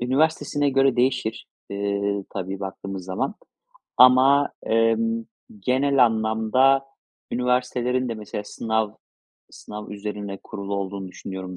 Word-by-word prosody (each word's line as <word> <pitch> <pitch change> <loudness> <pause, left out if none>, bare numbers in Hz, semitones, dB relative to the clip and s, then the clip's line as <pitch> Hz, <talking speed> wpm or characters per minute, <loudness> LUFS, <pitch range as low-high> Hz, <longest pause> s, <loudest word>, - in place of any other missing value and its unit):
üniversitesine 145 +2 +1
göre 135 -1 +3
değişir, 120 -3 0 0.2
eee, 100 0 -1
tabii 95 0 -5
baktığımız 95 -1 -6
zaman 105 - -2 0.6
ama, 130 +3 +6 0.2
emm, 225 - +2 0.4
genel 135 -1 +3
anlamda 110 +4 +3 0.5
üniversitelerin 125 0 0
de 115 - -2
mesela 105 -1 -6
sınav 110 0 -1 0.6
sınav 105 0 -9
üzerine 105 -1 -5
kurulu 100 0 -5
olduğunu 100 -1 -4
düşünüyorum 95 0 -7
110 Hz, 105 wpm, -24 LUFS, 100-130 Hz, 0.6 s, ama